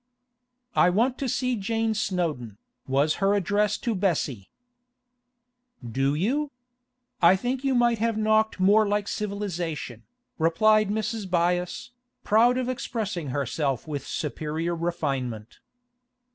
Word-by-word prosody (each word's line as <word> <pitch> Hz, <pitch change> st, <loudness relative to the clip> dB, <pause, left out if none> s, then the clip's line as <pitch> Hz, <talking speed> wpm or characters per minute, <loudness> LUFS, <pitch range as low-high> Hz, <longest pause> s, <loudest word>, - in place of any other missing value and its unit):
'I 180 Hz, -, +5 dB
want 240 Hz, +7 st, +1 dB
to 270 Hz, -, -1 dB
see 250 Hz, 0 st, 0 dB
Jane 225 Hz, +2 st, -1 dB
Snowdon,' 170 Hz, -, -2 dB, 0.3 s
was 140 Hz, +3 st, +2 dB
her 195 Hz, +1 st, +3 dB
address 205 Hz, +2 st, +1 dB
to 235 Hz, -, -2 dB
Bessie. 160 Hz, -, -1 dB, 1.4 s
'Do 135 Hz, +4 st, 0 dB
you? 270 Hz, -, 0 dB, 0.7 s
I 175 Hz, +2 st, +7 dB
think 250 Hz, +7 st, -2 dB
you 270 Hz, -1 st, +1 dB
might 240 Hz, -2 st, +3 dB
have 230 Hz, 0 st, 0 dB
knocked 220 Hz, -1 st, +2 dB
more 205 Hz, +3 st, +5 dB
like 205 Hz, 0 st, 0 dB
civilisation,' 175 Hz, -, -4 dB, 0.4 s
replied 215 Hz, +6 st, +3 dB
Mrs. 215 Hz, 0 st, -2 dB
Byass, 175 Hz, +3 st, 0 dB, 0.3 s
proud 235 Hz, +4 st, +4 dB
of 255 Hz, -1 st, -1 dB
expressing 220 Hz, -, -3 dB
herself 140 Hz, 0 st, -2 dB
with 145 Hz, -3 st, -5 dB
superior 160 Hz, +3 st, -3 dB
refinement. 135 Hz, -10 st, -3 dB
195 Hz, 120 wpm, -26 LUFS, 155-220 Hz, 1.4 s, I